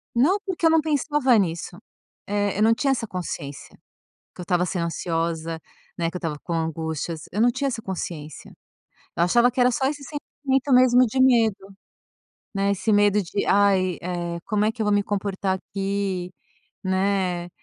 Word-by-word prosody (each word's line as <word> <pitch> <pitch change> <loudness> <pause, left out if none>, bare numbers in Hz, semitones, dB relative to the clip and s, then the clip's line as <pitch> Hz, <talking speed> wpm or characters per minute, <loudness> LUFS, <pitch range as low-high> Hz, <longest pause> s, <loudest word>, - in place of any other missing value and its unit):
Não, 310 +12 +4
porque 360 -3 -2
eu - - +7
não 320 -1 +4
pensava 295 -4 +2
nisso, 175 -2 -2 0.5
eh, 205 -1 0
eu 210 - +3
não 225 +1 +5
tinha 275 +3 +1
essa 235 -4 -1
consciência 150 -6 -6 0.6
que - - -11
eu - - -4
estava 180 0 +1
sendo 170 -1 -2
ansiosa, 165 0 -2 0.4
né, 165 -1 -1
que 180 - -7
eu - - -2
estava 160 -4 -3
com 170 - -5
angústias. 160 0 -3
Eu 210 - -1
não 245 - +5
tinha 265 +3 -1
essa 235 -3 -3
consciência, 165 -6 -6 0.7
eu 170 - +2
achava 240 +7 +4
que 250 - -5
era 250 0 +5
só 265 +2 -1
esse 285 0 -4
sentimento 275 -2 -2
mesmo 250 0 +6
de 260 +3 0
medo, 220 -6 +3 0.8
né, 200 0 +1
esse 200 +2 0
medo 205 0 +4
de: 195 +3 -3
"Ai, 195 -3 +3
eh, 175 -1 -3
como 210 -1 0
é 215 - +2
que 225 -1 -4
eu - - 0
vou 210 - +2
me 205 0 +3
comportar 195 -1 -2
aqui?", 195 -2 -3 0.5
né. 190 -2 0
200 Hz, 180 wpm, -24 LUFS, 175-245 Hz, 0.8 s, eu